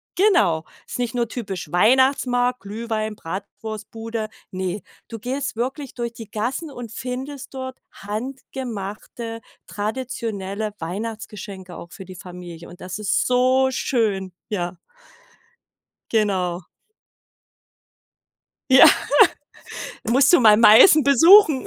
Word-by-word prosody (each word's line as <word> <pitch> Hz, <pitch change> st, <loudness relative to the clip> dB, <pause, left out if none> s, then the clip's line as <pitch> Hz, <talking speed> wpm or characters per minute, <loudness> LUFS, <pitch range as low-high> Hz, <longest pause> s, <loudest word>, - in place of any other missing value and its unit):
genau. 210 Hz, -, +3 dB, 0.2 s
Ist -, -, -5 dB
nicht 245 Hz, -2 st, -2 dB
nur 240 Hz, -1 st, 0 dB
typisch 195 Hz, -, -6 dB
Weihnachtsmarkt, 250 Hz, +4 st, +3 dB
Glühwein, 215 Hz, +1 st, -4 dB
Bratwurstbude. 215 Hz, +4 st, -6 dB, 0.2 s
Ne, 185 Hz, +1 st, -4 dB, 0.3 s
du 225 Hz, -, -7 dB
gehst 260 Hz, +3 st, -3 dB
wirklich 265 Hz, +3 st, -4 dB
durch 235 Hz, -1 st, -4 dB
die 225 Hz, -3 st, -11 dB
Gassen 260 Hz, +8 st, -3 dB
und 240 Hz, -4 st, -8 dB
findest 260 Hz, +4 st, -6 dB
dort 260 Hz, 0 st, -6 dB
handgemachte, 230 Hz, -1 st, -6 dB, 0.3 s
traditionelle 215 Hz, -2 st, -4 dB
Weihnachtsgeschenke 200 Hz, 0 st, -7 dB
auch 170 Hz, -, -11 dB
für 190 Hz, -, -10 dB
die 185 Hz, -, -11 dB
Familie. 175 Hz, -2 st, -10 dB
Und 175 Hz, -, -14 dB
das 185 Hz, +2 st, -6 dB
ist 215 Hz, -2 st, 0 dB
so 255 Hz, +1 st, +3 dB
schön, 215 Hz, -7 st, -1 dB, 0.2 s
ja. 180 Hz, -3 st, -3 dB, 1.3 s
Genau. 185 Hz, -5 st, 0 dB, 2.0 s
Ja, 265 Hz, -, +9 dB, 1.3 s
musst 270 Hz, +5 st, +5 dB
du 350 Hz, -, +6 dB
mal 215 Hz, -3 st, +7 dB
Meißen 230 Hz, -, +8 dB
besuchen. 300 Hz, -, +6 dB
225 Hz, 105 wpm, -22 LUFS, 195-255 Hz, 2.0 s, Ja